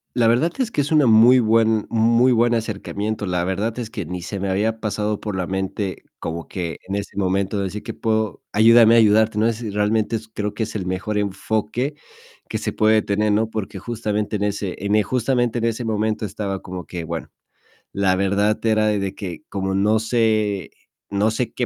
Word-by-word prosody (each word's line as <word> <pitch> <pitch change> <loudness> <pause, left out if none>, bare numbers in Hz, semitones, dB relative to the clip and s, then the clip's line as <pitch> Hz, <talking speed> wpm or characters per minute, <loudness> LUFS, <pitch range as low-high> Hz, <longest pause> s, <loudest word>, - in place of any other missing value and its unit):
La 120 -2 +3
verdad 120 +9 +3
es 250 -3 0
que 150 - -1
es 145 +2 -1
una 150 -4 +4
muy 115 +3 +7
buen 110 -2 +3
muy 115 +3 +4
buen 120 0 +3
acercamiento. 110 -1 -3
La 90 -1 0
verdad 105 +6 -2
es 115 -2 -4
que 100 -8 -5
ni 90 +1 -5
se 95 +2 -5
me 100 - -2
había 110 +4 0
pasado 105 -1 -2
por 105 -3 -4
la 90 -1 -2
mente, 95 0 -3 0.2
como 85 0 -5
que, 85 -3 -4
en 95 - -2
ese 100 -1 -5
momento, 95 +1 0
de 100 - -1
decir 100 +2 -5
que - - -6
puedo 110 -1 -1
ayúdame 115 +1 +6
a 115 - +6
ayudarte, 110 0 +4
no, 115 +2 +3
si 110 -1 -6
realmente 105 +2 +1
s 110 0 -8
creo 105 0 -3
que 115 - -3
es 110 - -4
el 95 -4 -3
mejor 105 +3 -2
enfoque 110 +6 -2 0.5
que - - -3
se - - -3
puede 110 0 +3
tener, 105 +1 +1
¿no? 110 +2 +1
Porque 105 -3 -5
justamente 105 0 -2
en 105 - -1
ese 100 -2 -2
en 105 +1 +2
e 105 - +4
justamente 120 +1 0
en 115 - 0
ese 115 +1 -2
momento 110 0 -1
estaba 100 -1 -4
como 90 -1 -7
que, 85 -2 -6
bueno, 80 -1 -5 0.6
la 95 -2 +1
verdad 100 +2 +1
era 110 -1 +3
de 100 -2 -1
que, 90 -4 -7
como 95 -1 -2
no 105 +3 +3
sé 110 -3 0 0.4
no 105 +2 +2
sé 115 0 -2
qué 125 - -1
105 Hz, 210 wpm, -21 LUFS, 100-115 Hz, 0.6 s, muy